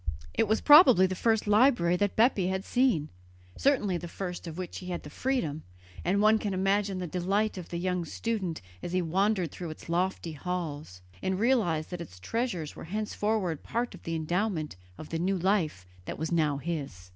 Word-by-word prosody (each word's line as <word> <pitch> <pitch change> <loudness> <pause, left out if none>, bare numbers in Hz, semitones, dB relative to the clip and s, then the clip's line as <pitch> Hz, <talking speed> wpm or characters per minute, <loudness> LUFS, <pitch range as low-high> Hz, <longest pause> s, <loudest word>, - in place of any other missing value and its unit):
It 225 - +2
was 220 +2 +1
probably 275 - +8
the 185 - -1
first 220 +3 +1
library 210 -5 +4
that 205 +1 0
Bepi 220 -5 +3
had 190 +1 -2
seen, 245 - +2 0.5
certainly 215 -10 +2
the 175 - -7
first 180 0 -6
of 165 0 -7
which 185 -2 -5
he 180 - -9
had 180 - -3
had 175 - -5
the 150 - -9
freedom, 165 - -1 0.4
and 190 +4 +1
one 215 +1 +5
can 205 -3 -2
imagine 195 +1 +1
the 180 - -3
delight 195 +5 0
of 180 -3 -8
the 170 - -4
young 180 0 -1
student 190 - -3 0.2
as 175 - -5
he 185 - +2
wandered 185 0 +1
through 175 -2 -6
its 155 - -10
lofty 175 0 -1
halls, 150 - -5 0.2
and 190 0 -1
realized 205 -11 +1
that 175 -1 -5
its 90 - -10
treasures 185 - -3
were - - -8
henceforward 210 -3 -1
part 240 +1 -2
of - - -12
the 165 - -3
endowment 165 - -1 0.2
of 155 - -9
the 165 - -2
new 190 +3 +1
life 175 - 0 0.2
that - - -5
was 160 +2 -3
now 155 -4 +2
his. 140 - -5
185 Hz, 195 wpm, -29 LUFS, 165-210 Hz, 0.5 s, probably